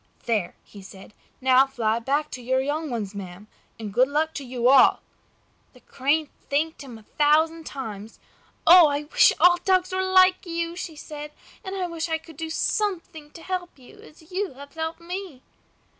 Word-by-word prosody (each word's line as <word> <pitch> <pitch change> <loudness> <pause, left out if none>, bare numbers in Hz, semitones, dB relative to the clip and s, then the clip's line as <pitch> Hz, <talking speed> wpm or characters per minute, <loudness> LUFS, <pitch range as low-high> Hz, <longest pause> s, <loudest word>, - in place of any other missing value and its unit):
"There!" 215 -7 -1
he 200 - -14
said. 195 +1 -14 0.3
"Now 260 +1 +5
fly 230 -4 -1
back 285 +5 -1
to 250 - -7
your 260 +2 0
young 295 +3 -2
ones, 215 -5 -4
ma'am, 190 0 -9 0.3
and 210 -3 -7
good 250 +4 +4
luck 310 +3 -1
to 285 - -6
you 245 -1 -1
all!" 265 0 +5 0.7
The 250 - -18
Crane 285 +4 -1 0.2
thanked 310 +4 -1
him 250 -4 -10
a 220 - -16
thousand 315 +5 +1
times. 220 -5 -8 0.5
"I 315 -4 +6
wish - - +6
all 355 0 +6
dogs 370 0 +1
were 375 - 0
like 370 0 +4
you!" 335 0 -3
she 340 -3 -7
said. 300 0 -9 0.3
"And 380 -1 -6
I 375 -2 -2
wish 335 -1 -4
I 320 - 0
could 320 -2 -16
do 320 0 -5
something 330 -4 -2
to 325 +2 -13
help 365 -3 -5
you, 255 -2 -17
as 315 +2 -18
you 380 -3 -3
have 280 +2 -13
helped 320 +1 -5
me." 350 -6 -7
300 Hz, 180 wpm, -24 LUFS, 255-335 Hz, 0.7 s, I